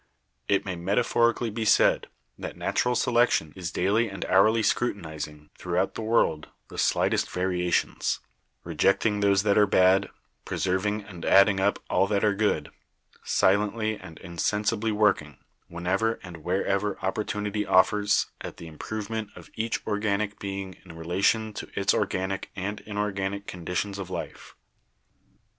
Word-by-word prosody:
"It 100 Hz, -, +2 dB
may 90 Hz, -2 st, -3 dB
metaphorically 115 Hz, +5 st, +1 dB
be 110 Hz, +1 st, -3 dB
said 110 Hz, -, +4 dB, 0.3 s
that -, -, -7 dB
natural 125 Hz, 0 st, 0 dB
selection 120 Hz, -12 st, +2 dB
is 90 Hz, -3 st, -4 dB
daily 105 Hz, +5 st, +1 dB
and 95 Hz, -2 st, -5 dB
hourly 110 Hz, +4 st, +4 dB
scrutinizing, 80 Hz, -10 st, -2 dB
throughout 90 Hz, +2 st, -1 dB
the -, -, -5 dB
world, 110 Hz, -9 st, +1 dB, 0.2 s
the -, -, -7 dB
slightest -, -, +1 dB
variations; 90 Hz, -1 st, 0 dB, 0.4 s
rejecting 105 Hz, +1 st, +1 dB
those 100 Hz, -1 st, +3 dB
that 105 Hz, 0 st, +3 dB
are 105 Hz, -, +5 dB
bad, 95 Hz, 0 st, +4 dB, 0.3 s
preserving 105 Hz, +3 st, -1 dB
and 90 Hz, -4 st, -11 dB
adding 100 Hz, 0 st, +5 dB
up 100 Hz, +2 st, +2 dB
all 95 Hz, -, +2 dB
that 100 Hz, -1 st, 0 dB
are 105 Hz, -1 st, +3 dB
good; 105 Hz, +1 st, 0 dB, 0.5 s
silently 105 Hz, +3 st, +1 dB
and 90 Hz, -5 st, -12 dB
insensibly 105 Hz, +5 st, -1 dB
working, 100 Hz, -9 st, +1 dB, 0.3 s
whenever 95 Hz, +6 st, 0 dB
and 90 Hz, -2 st, -9 dB
wherever 95 Hz, +4 st, -1 dB
opportunity* 105 Hz, +1 st, -2 dB
offers, 105 Hz, +1 st, +3 dB, 0.2 s
at -, -, -7 dB
the -, -, -9 dB
improvement 105 Hz, +6 st, -5 dB
of -, -, -13 dB
each 115 Hz, +1 st, -3 dB
organic 105 Hz, -1 st, -1 dB
being 95 Hz, -2 st, -5 dB
in 90 Hz, -, -12 dB
rela 85 Hz, +4 st, -4 dB
tion 110 Hz, 0 st, +2 dB
to -, -, -7 dB
its 100 Hz, -, +3 dB
organic 95 Hz, -1 st, -1 dB
and 100 Hz, +2 st, -4 dB
inorganic 100 Hz, -1 st, -2 dB
conditions 90 Hz, +3 st, -4 dB
of 95 Hz, -2 st, -6 dB
life. 95 Hz, -, -7 dB
100 Hz, 140 wpm, -26 LUFS, 95-105 Hz, 0.5 s, are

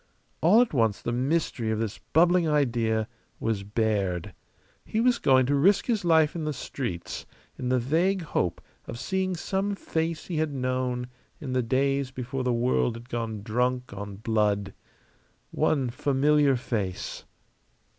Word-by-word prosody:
All 195 Hz, +9 st, +6 dB
at 245 Hz, -, 0 dB
once 115 Hz, -6 st, +2 dB
the 120 Hz, -, -3 dB
mystery 130 Hz, -2 st, 0 dB
of 110 Hz, -, 0 dB
this 110 Hz, -1 st, -3 dB
bubbling 175 Hz, +1 st, +3 dB
idea 115 Hz, -7 st, +1 dB, 0.3 s
was 110 Hz, -3 st, -1 dB
bared: 100 Hz, -4 st, -1 dB, 0.5 s
he 215 Hz, -, -2 dB
was 245 Hz, +1 st, +3 dB
going 130 Hz, -2 st, +4 dB
to 140 Hz, -, +1 dB
risk 180 Hz, +9 st, +4 dB
his 225 Hz, -5 st, 0 dB
life 160 Hz, -2 st, +4 dB
in 165 Hz, -, -3 dB
the 150 Hz, 0 st, -1 dB
streets 115 Hz, -11 st, -5 dB, 0.3 s
in 125 Hz, -, -3 dB
the 130 Hz, -, +3 dB
vague 170 Hz, +9 st, +1 dB
hope 90 Hz, -, -1 dB, 0.3 s
of -, -, -6 dB
seeing 185 Hz, +7 st, -1 dB
some 195 Hz, +3 st, -1 dB
face 165 Hz, -3 st, -2 dB
he 170 Hz, -, -4 dB
had 155 Hz, -1 st, 0 dB
known 130 Hz, -1 st, -1 dB, 0.3 s
in 130 Hz, -3 st, -5 dB
the 130 Hz, -, +2 dB
days 135 Hz, +3 st, +1 dB
before 130 Hz, 0 st, -4 dB
the 125 Hz, -, +1 dB
world 120 Hz, 0 st, +1 dB
had 120 Hz, +2 st, -11 dB
gone 115 Hz, -4 st, -3 dB
drunk 125 Hz, +2 st, -1 dB
on 100 Hz, 0 st, -6 dB
blood. 105 Hz, -2 st, 0 dB, 0.8 s
One 135 Hz, -6 st, +1 dB
familiar 140 Hz, +2 st, +3 dB
face. 105 Hz, -7 st, -3 dB
130 Hz, 155 wpm, -27 LUFS, 115-155 Hz, 0.8 s, All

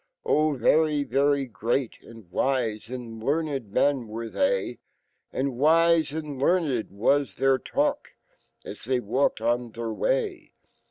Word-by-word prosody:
Oh! 150 Hz, -2 st, +2 dB
very^ery 140 Hz, -2 st, +2 dB
great 120 Hz, +2 st, -2 dB
and 115 Hz, -5 st, -14 dB
wise 115 Hz, -3 st, -1 dB
and 115 Hz, -3 st, -7 dB
learned 140 Hz, -6 st, -1 dB
men 135 Hz, 0 st, +1 dB
were 115 Hz, +1 st, -6 dB
fhey, 480 Hz, +13 st, 0 dB, 0.5 s
And 130 Hz, -2 st, -2 dB
wise 165 Hz, +1 st, +4 dB
analearned 150 Hz, -3 st, 0 dB
was 115 Hz, +3 st, +1 dB
th -, -, -7 dB
r 135 Hz, -1 st, +4 dB
talk, -, -, -1 dB, 0.5 s
as -, -, -8 dB
they 130 Hz, +1 st, +1 dB
walked 125 Hz, +1 st, 0 dB
on 120 Hz, +1 st, 0 dB
fh -, -, -20 dB
r 115 Hz, -1 st, -3 dB
way. 410 Hz, -, -1 dB
135 Hz, 130 wpm, -26 LUFS, 115-150 Hz, 0.5 s, wise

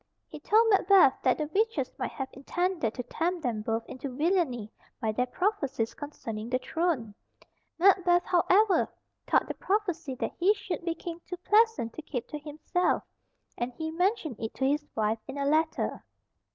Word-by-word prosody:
He -, -, -9 dB
told 445 Hz, +2 st, +4 dB
Macbeth 385 Hz, -7 st, +6 dB
that 255 Hz, -, +3 dB
the 305 Hz, -, -1 dB
witches 450 Hz, +3 st, 0 dB
might -, -, -1 dB
have 270 Hz, -2 st, -4 dB
intended 330 Hz, -, -1 dB
to 250 Hz, -, -3 dB
tempt 335 Hz, +7 st, -2 dB
them 230 Hz, -5 st, -1 dB
both 225 Hz, +1 st, -2 dB
into 260 Hz, +2 st, -6 dB
villainy 265 Hz, -, 0 dB, 0.3 s
by 220 Hz, -, 0 dB
their 250 Hz, +4 st, 0 dB
prophecies 285 Hz, -, -1 dB
concerning 230 Hz, -7 st, -6 dB
the 255 Hz, -, +2 dB
throne. 290 Hz, -, -1 dB, 0.6 s
Macbeth, 355 Hz, -1 st, +4 dB
however, 375 Hz, +3 st, +3 dB, 0.4 s
thought -, -, +3 dB
the -, -, -3 dB
prophecy 360 Hz, -9 st, -1 dB
that -, -, -3 dB
he 390 Hz, +4 st, +4 dB
should 380 Hz, -4 st, -5 dB
be 335 Hz, -1 st, -1 dB
King 340 Hz, +1 st, -7 dB
too 360 Hz, -, -5 dB
pleasant 420 Hz, -, +3 dB
to -, -, -7 dB
keep 255 Hz, -6 st, -5 dB
to 300 Hz, -, -5 dB
himself, 310 Hz, +4 st, -1 dB, 0.6 s
and 240 Hz, +1 st, -1 dB
he 320 Hz, +4 st, -4 dB
mentioned 350 Hz, -, 0 dB
it 225 Hz, -, -5 dB
to 265 Hz, -, 0 dB
his 290 Hz, +2 st, +1 dB
wife 220 Hz, 0 st, +1 dB
in 270 Hz, +1 st, -6 dB
a 280 Hz, -, -1 dB
letter. 315 Hz, +2 st, +1 dB
315 Hz, 170 wpm, -29 LUFS, 250-365 Hz, 0.6 s, Macbeth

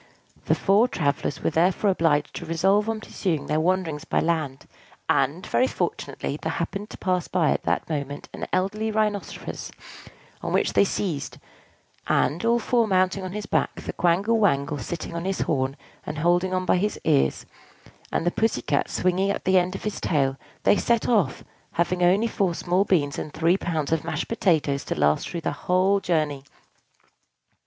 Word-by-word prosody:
The -, -, +3 dB
four 205 Hz, +5 st, +3 dB
travellers 145 Hz, -, -1 dB
were -, -, +1 dB
therefore 180 Hz, +5 st, +2 dB
obliged 160 Hz, -5 st, +1 dB
to 170 Hz, -, -6 dB
resolve 195 Hz, +6 st, +2 dB
on 220 Hz, -1 st, -2 dB
pursuing 170 Hz, -8 st, -2 dB
their 155 Hz, +1 st, 0 dB
wanderings 165 Hz, -3 st, 0 dB
by -, -, 0 dB
land: 155 Hz, -5 st, -1 dB, 0.4 s
and, 140 Hz, +6 st, +1 dB
very 255 Hz, -, +2 dB
fortunately, -, -, -3 dB
there -, -, -2 dB
happened 205 Hz, +2 st, -4 dB
to -, -, -9 dB
pass 180 Hz, -2 st, -1 dB
by 170 Hz, -4 st, +2 dB
at -, -, 0 dB
that -, -, 0 dB
moment 145 Hz, -2 st, -4 dB
an -, -, -5 dB
elderly 210 Hz, +4 st, 0 dB
Rhinoceros, 210 Hz, -2 st, -2 dB, 0.7 s
on -, -, -3 dB
which -, -, +2 dB
they -, -, +5 dB
seized; 170 Hz, -7 st, -3 dB, 0.7 s
and, 160 Hz, +7 st, +1 dB
all 235 Hz, +1 st, +3 dB
four 235 Hz, 0 st, +1 dB
mounting 185 Hz, 0 st, +2 dB
on 185 Hz, 0 st, -5 dB
his 210 Hz, 0 st, -4 dB
back, -, -, 0 dB
the -, -, -5 dB
Quangle 195 Hz, +7 st, +2 dB
Wangle 145 Hz, -7 st, +1 dB
sitting 170 Hz, +3 st, -5 dB
on 170 Hz, -, -3 dB
his 195 Hz, 0 st, -1 dB
horn, 135 Hz, -1 st, 0 dB, 0.3 s
and 150 Hz, -, -6 dB
holding 175 Hz, +4 st, +2 dB
on 185 Hz, 0 st, -1 dB
by 185 Hz, -, +3 dB
his 210 Hz, +3 st, -1 dB
ears, 70 Hz, 0 st, +2 dB, 0.7 s
and -, -, -1 dB
the 175 Hz, -, +2 dB
Pussy 220 Hz, -, 0 dB
Cat 145 Hz, -1 st, 0 dB
swinging 185 Hz, +2 st, +1 dB
at 200 Hz, -, -2 dB
the 190 Hz, 0 st, +5 dB
end 180 Hz, +1 st, -2 dB
of -, -, -7 dB
his 210 Hz, -, -3 dB
tail, 135 Hz, -4 st, +1 dB, 0.3 s
they -, -, +5 dB
set 235 Hz, -2 st, +1 dB
off, 215 Hz, -6 st, +1 dB, 0.3 s
having 175 Hz, +2 st, 0 dB
only 185 Hz, +5 st, +4 dB
four 195 Hz, -6 st, 0 dB
small 180 Hz, +4 st, +1 dB
beans 150 Hz, -8 st, +1 dB
and 150 Hz, -, -5 dB
three 170 Hz, +3 st, +3 dB
pounds 160 Hz, -6 st, -2 dB
of 160 Hz, -1 st, +1 dB
mashed 160 Hz, -2 st, -3 dB
potatoes 155 Hz, -10 st, +1 dB
to -, -, -2 dB
last 75 Hz, +1 st, +2 dB
through 170 Hz, -, -4 dB
their -, -, -2 dB
whole 185 Hz, +2 st, +2 dB
journey. 155 Hz, -7 st, -1 dB
180 Hz, 180 wpm, -25 LUFS, 155-200 Hz, 0.7 s, they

